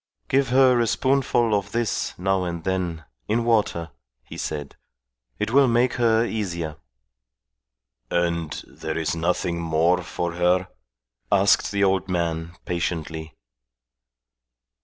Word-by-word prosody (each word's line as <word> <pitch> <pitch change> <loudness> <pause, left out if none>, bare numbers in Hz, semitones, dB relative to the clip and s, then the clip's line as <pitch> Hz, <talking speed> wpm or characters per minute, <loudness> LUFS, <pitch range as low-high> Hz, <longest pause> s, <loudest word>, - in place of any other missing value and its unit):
"Give 135 -1 +2
her 130 -1 +5
a 120 - +2
spoonful 125 -3 +2
of 100 -1 -1
this 120 -2 -1
now 95 +1 +1
and 85 -2 -4
then, 90 -4 -2 0.2
in 115 +2 +1
water," 105 -8 +1 0.3
he - - -11
said. 75 -3 -5 0.6
"It - - -2
will 135 +1 +5
make 120 +1 +2
her 115 0 +4
easier." 85 -9 -3 1.3
"And 85 -2 0 0.2
there - - -5
is - - -1
nothing 85 0 -1
more 85 +2 +2
for 85 0 -3
her?" 90 +1 +2 0.6
asked 100 0 +4
the 100 0 +1
old 95 -1 +1
man, 85 -1 -2
patiently. 80 -2 -3
90 Hz, 120 wpm, -24 LUFS, 85-115 Hz, 1.3 s, her